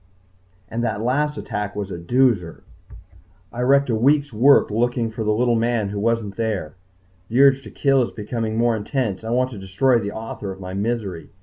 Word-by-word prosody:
and 115 +5 -3
that 120 - -1
last 150 +5 0
attack 105 0 -4
was 100 -1 -4
a - - -4
doozer! 105 -3 +1 0.9
I 120 - -4
wrecked 140 +2 +3
a - - +1
week's 140 +4 +2
work 130 +2 +5
looking 120 +1 0
for 110 0 -4
the 105 - +1
little 120 +3 +2
man 115 -2 0
who 100 0 -4
wasn't 110 -2 -1
there. 110 -9 -2 0.6
The 120 - 0
urge 135 -1 +6
to - - -11
kill 135 -2 +2
is 120 - -1
becoming 110 0 -4
more 120 0 +2
intense. 110 -2 -2
I 110 - -5
want 130 +2 +1
to 110 - -8
destroy 115 +7 +2
the 100 -2 -4
author 110 -2 -6
of 95 - -9
my 95 -1 -7
misery. 100 -4 -3
115 Hz, 195 wpm, -22 LUFS, 105-125 Hz, 0.9 s, urge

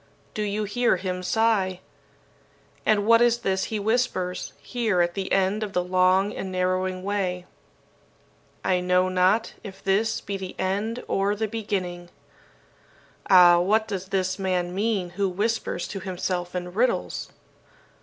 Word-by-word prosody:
Do 215 - -3
you 210 +1 -1
hear 225 +2 +1
him 180 0 -3
sigh? 195 -2 +1 1.1
And 205 -1 +3
what 230 +1 +6
is 240 -1 +4
this 190 -2 0
he 220 - -3
whispers, 205 -4 -1
here 225 -7 -1
at 175 0 +2
the 190 0 -4
end 195 +2 +2
of 210 -2 -4
the 180 - +1
long 185 +2 +2
and 190 - -5
narrowing 185 0 -1
way 185 -3 -2 1.2
'I 180 -1 +2
know 180 +1 +2
not 185 +5 +2
if 195 -2 -10
this 210 +3 +1
be 200 -1 -5
the 190 -1 -7
end 205 +6 -2
or 200 +1 +1
the 220 +1 -1
beginning!' 185 -5 -4 1.2
Ah, 175 -2 +8
what 215 +5 +2
does 190 -3 -4
this 185 0 -1
man 180 -2 -1
mean 200 -3 -1
who 195 +2 -1
whispers 205 -1 -2
to 195 - -5
himself 180 -1 -3
in 180 0 -4
riddles? 245 +6 -1
190 Hz, 145 wpm, -25 LUFS, 180-210 Hz, 1.2 s, Ah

